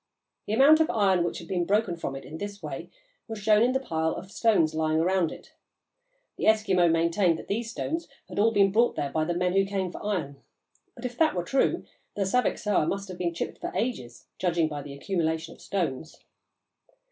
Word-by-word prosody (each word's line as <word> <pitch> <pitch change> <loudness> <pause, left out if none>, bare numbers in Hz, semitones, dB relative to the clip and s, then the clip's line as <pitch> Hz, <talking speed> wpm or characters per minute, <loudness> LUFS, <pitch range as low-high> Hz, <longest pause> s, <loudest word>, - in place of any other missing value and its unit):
The 210 - -1
amount 280 +7 +7
of 320 - +3
iron 190 -5 +3
which 175 - -2
had 170 - -9
been 180 -1 0
broken 200 0 +1
from 150 -5 -5
it 135 - -8
in 160 +2 -8
this 205 -2 -6
way 140 -3 -6 0.4
was 225 -1 -5
shown 215 +2 +4
by - - +1
the 265 0 -1
pile 160 -4 -1
of 190 - -9
stones 205 -9 +2
lying 155 0 +1
around 180 -1 +2
it. - - -12 0.8
The - - -2
Eskimo 195 -5 +4
maintained 170 +1 +2
that - - -10
these 225 +3 -2
stones 325 +8 -3 0.2
had - - -5
all 220 +2 +5
been 200 -2 +4
brought 235 +4 +3
there 140 - -2
by 155 +1 0
the 175 +1 -1
men 180 +1 +1
who 195 0 +4
came 195 -2 -2
for - - -9
iron; 155 -10 -3 0.5
but 240 - -9
if 245 -1 -5
that 320 -7 +3
were 175 - -1
true, 270 +9 +1 0.3
the 205 - 0
Saviksoah 210 -5 +1
must 195 +2 -3
have 185 - -8
been 175 -1 0
chipped - - -4
for - - -4
ages, 125 - -3
judging 170 -3 +1
by 150 -2 -5
the 140 -1 -9
accumulation 160 0 -2
of - - -19
stones. 160 -5 -3
185 Hz, 210 wpm, -27 LUFS, 165-215 Hz, 0.8 s, amount